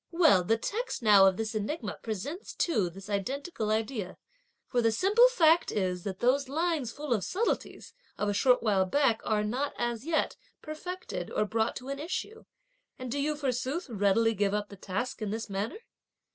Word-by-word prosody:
Well, 325 - +5
the 225 +6 +2
text 430 - -3
now 200 -3 +7
of 190 -1 +2
this 225 0 -3
enigma 215 +2 -3
presents 240 - -5
too 215 - +1
this 195 +3 -11
identical 220 - -3
idea, 215 -3 -2 0.5
for 245 - +1
the 225 -1 +3
simple 410 - +5
fact 335 -8 +4
is 180 -3 -1
that 190 -2 -3
those 260 +2 +2
lines 315 -4 0
full 290 -1 -2
of 210 -5 -1
subtleties 430 +6 -2 0.2
of 210 - -1
a 205 - +1
short 250 +4 +3
while 200 -4 +3
back 240 -1 +2
are 210 -1 +1
not, 255 +7 -2
as 235 -1 -2
yet, 315 +1 0 0.2
perfected 360 +4 -6
or 210 - 0
brought 220 +1 0
to 260 +1 -7
an 275 0 -4
issue, 370 +7 -5 0.5
and 255 -2 -6
do 285 - -1
you 300 +2 0
forsooth 275 +4 -2
readily 215 +2 +3
give 205 -1 +1
up 210 0 -2
the 200 - -10
task 205 +6 -4
in 215 - -2
this 220 0 -4
manner?" 200 - -3
235 Hz, 185 wpm, -29 LUFS, 210-300 Hz, 0.5 s, now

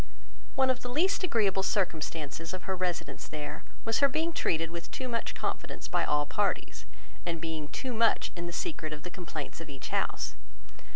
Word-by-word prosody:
One 265 0 +6
of 255 - -2
the 245 - -4
least 340 +10 +3
agreeable 210 - +4
circumstances 165 -4 0
of 185 - -7
her 190 - 0
residence 175 -5 -1
there 150 -1 -4 0.2
was 225 0 +3
her 280 0 +7
being 320 +5 +1
treated 165 - +2
with 170 0 -5
too 260 - -3
much 235 -2 -1
confidence - - -2
by - - +2
all 150 0 +3
parties, 200 - 0 0.4
and 165 -1 -1
being 160 -2 -2
too 255 - -3
much 230 0 +4
in 170 -1 -3
the - - -3
secret 170 - -2
of 150 0 -7
the 180 - -5
complaints 165 -4 -5
of 160 - -7
each 135 -2 -6
house. - - 0
175 Hz, 185 wpm, -31 LUFS, 155-230 Hz, 0.4 s, her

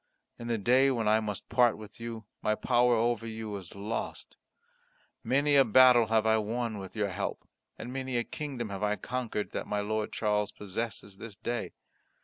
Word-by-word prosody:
In 120 - -6
the 115 -1 0
day 125 +6 +4
when 115 -5 0
I 110 +1 +5
must 105 -3 -4
part 120 -1 +3
with 105 0 -12
you, 115 -2 -6 0.2
my 110 - +1
power 120 +2 +3
over 115 0 0
you 110 -2 -5
is 95 -2 -10
lost. 105 +3 -5 0.9
Many 145 +2 +3
a 135 - +8
battle 125 0 +6
I 115 - +1
have 110 -1 +3
won 115 0 -2
with 95 +1 -9
your 105 -2 0
help; 95 +2 -4 0.3
and 125 - -7
many 130 -2 -2
a 120 - +1
kingdom 130 -5 -5
have 100 0 -5
I 105 0 +1
conquered, 120 -3 -3
that - - -4
my 105 0 -1
Lord 110 +1 -2
Charles 105 -1 0
possesses 105 0 -5
this 110 -2 -8
day. 120 +3 -4
110 Hz, 185 wpm, -30 LUFS, 105-120 Hz, 0.9 s, a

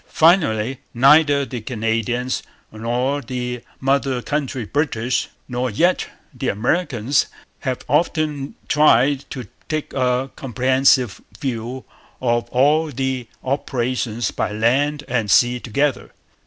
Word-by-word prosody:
Finally, 135 - +3 0.2
neither 140 +2 +5
the 125 -3 -6
Canadians, 115 +2 -1 0.3
nor 125 +6 -1
the 125 -1 -4 0.2
mother 135 -1 +1
country 140 -5 -2
British, 125 -2 0 0.2
nor 125 0 -1
yet 170 - +2 0.3
the - - -4
Americans, 130 - +1 0.3
have 130 -2 -3
often 150 -1 0
tried 140 -2 +4
to 125 -6 -6 0.2
take 155 -1 -3
a 130 0 0
comprehensive 130 -2 +2 0.2
view 125 0 -4 0.3
of 120 -1 0
all 150 +5 +3
the 130 -3 -3 0.2
operations 125 -3 -1
by - - -2
land 135 +7 +1
and 115 -4 -1
sea 120 +4 +4
together. 140 +4 -1
130 Hz, 110 wpm, -21 LUFS, 120-145 Hz, 0.3 s, neither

